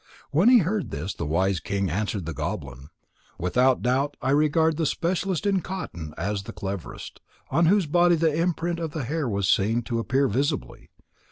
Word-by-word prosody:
When 170 +11 +5
he 250 - +8
heard 205 +2 -1
this, 80 +8 -4
the - - -5
wise 95 +4 +1
king 100 -2 -2
answered 100 0 -2
the 85 - -4
goblin: 65 0 -5 0.5
"Without 125 +9 +2
doubt 135 +4 0
I 135 - 0
regard 155 +2 +3
the 160 -2 +1
specialist 180 +3 -1
in 195 -2 +2
cotton 85 - -6
as 100 +3 -2
the 100 - -9
cleverest, 95 -3 -6 0.3
on 170 0 +3
whose 195 +1 +4
body 175 +3 +4
the 160 -1 +2
imprint 170 +1 -1
of 165 -2 -4
the 155 -5 -3
hair 145 +1 -2
was 100 -2 0
seen 110 +5 +2
to 115 0 -2
appear 135 +4 +1
visibly. 140 +7 -2
135 Hz, 180 wpm, -25 LUFS, 100-165 Hz, 0.5 s, he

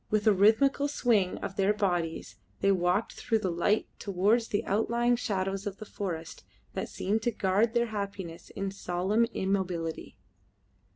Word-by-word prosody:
With 215 -1 +1
a 215 - +6
rhythmical 225 +8 +4
swing 225 -10 +1
of 195 - -5
their 200 +2 +3
bodies 175 - -1 0.2
they 195 - +3
walked 185 +3 +1
through 225 - 0
the 190 -4 -1
light 190 +6 +1
towards 205 +4 +2
the 205 - -1
outlying 235 +4 +2
shadows 195 -3 -2
of 200 -1 -5
the 215 - -8
forests 170 -6 -5 0.3
that - - -3
seemed 210 +4 -1
to 240 - +1
guard 210 +3 +1
their 235 0 +3
happiness 195 -6 -5
in 195 0 -4
solemn 195 +4 0
immobility. 185 - -2
200 Hz, 155 wpm, -29 LUFS, 185-220 Hz, 0.3 s, a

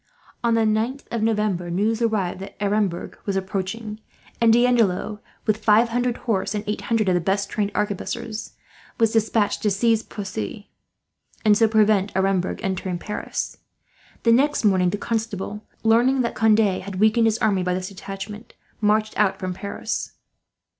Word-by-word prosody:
On 235 -1 +3
the 225 - +3
9th 220 +5 0
of 235 - -1
November 210 -5 0
news 215 +6 0
arrived 210 -6 0
that 195 +1 -9
Aremberg 200 -3 -1
was 200 - 0
approaching, 195 +3 -3 0.4
and 230 -1 +6
D'Andelot, 225 -4 +2 0.3
with 215 0 0
five 225 +2 +5
hundred 245 +1 0
horse 210 -3 0
and 210 - -2
eight 210 - -2
hundred 225 -3 +2
of 185 - +3
the 175 - +2
best 195 +3 -1
trained 205 -2 -1
arquebusiers, 215 +2 -3 0.5
was 225 -1 +4
despatched 220 -1 +1
to 210 - +2
seize 225 +3 +2
Poissy, 195 - -6 0.8
and 210 -1 +6
so 225 +1 +4
prevent 215 -2 +3
Aremberg 190 -1 0
entering 185 -1 -2
Paris. 210 +4 -4 0.7
The 230 - +4
next 275 +1 +3
morning 185 -3 +4
the 205 - -2
Constable, 210 -2 -3 0.2
learning 240 +4 +4
that 235 - -1
Conde 220 -1 +4 0.2
had 190 -1 -6
weakened 220 +2 +4
his 220 0 +1
army 205 -5 +2
by 180 0 0
this 185 0 -4
detachment, 200 +3 -8 0.3
marched 215 +1 +2
out 195 -2 +3
from 185 -2 -3
Paris. 200 +2 -4
210 Hz, 160 wpm, -23 LUFS, 195-225 Hz, 0.8 s, and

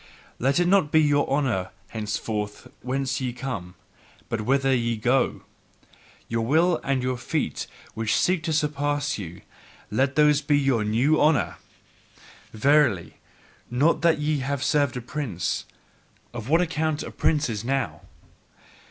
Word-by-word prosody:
Let 135 +5 +2
it 175 - +3
not 180 -6 +3
be 160 - +5
your 145 -2 +2
honour 130 -10 0 0.2
henceforth 105 -1 -4
whence 135 +1 -2
ye 125 -2 -2
come, 115 -9 -5 0.5
but 115 - -2
whither 135 +4 +2
ye 115 -2 0
go! 125 +4 +1 0.8
Your 115 0 -1
Will 160 +7 +2
and 135 -2 0
your 130 0 -1
feet 125 - -2 0.3
which 110 -1 0
seek 180 -2 +2
to 165 - -1
surpass 145 -3 0
you 90 -3 -8 0.5
let 130 +5 +1
these 150 -1 +4
be 145 -1 +2
your 135 -6 +2
new 125 +9 +2
honour! 150 -3 +2 0.9
Verily, 115 - +2 0.5
not 140 +7 +2
that 170 -1 +4
ye 150 0 0
have 135 0 -2
served 145 -3 +1
a - - -4
prince 120 - -3 0.7
of 120 +1 -6
what 165 +3 +4
account 160 -3 -1
are - - -7
princes 125 -9 0
now! 120 - -2
135 Hz, 140 wpm, -25 LUFS, 115-150 Hz, 0.9 s, be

